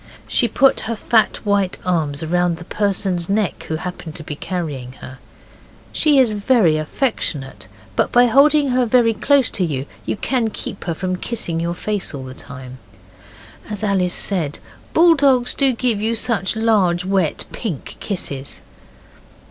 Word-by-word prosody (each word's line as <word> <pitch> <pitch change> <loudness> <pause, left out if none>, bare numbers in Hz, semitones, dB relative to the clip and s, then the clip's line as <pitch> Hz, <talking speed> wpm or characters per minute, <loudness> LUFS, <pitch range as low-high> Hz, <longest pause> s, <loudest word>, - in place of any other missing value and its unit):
She 240 - +2
put 265 +4 +3
her 230 - -1
fat 220 0 +2
white 200 -2 +1
arms 160 -4 0
round 175 +1 +1
the 175 - -9
person's 190 -3 -1
neck 200 -6 -1
who 160 - -2
happened 165 -1 -6
to 160 - -7
be 150 - -6
carrying 145 -8 -4
her. 130 0 -11 0.7
She 300 -2 +3
is 255 -4 +5
very 205 -5 +3
affectionate, 155 - -2 0.3
but - - +1
by 245 0 +6
holding 280 +4 +4
her 250 -1 +2
very 230 -1 +4
close 275 +3 +2
to 195 - -1
you 140 -6 -2 0.2
you - - -3
can 240 0 0
keep 205 - -7
her 170 - -2
from 185 +1 -2
kissing 175 -7 -3
your 170 +1 -2
face 205 -4 -3
all 135 - -6
the 130 0 -8
time. 130 -2 -10 0.9
As 210 0 -5
Alice 190 -3 +1
said, 170 -7 -1 0.4
'Bulldogs 280 -7 +4
do 275 -2 +2
give 230 -3 -1
you 225 +2 0
such 225 -3 -1
large, 200 -6 +2
wet, 190 -5 0
pink 185 - -5
kisses. 140 -9 -5
195 Hz, 155 wpm, -20 LUFS, 165-230 Hz, 0.9 s, by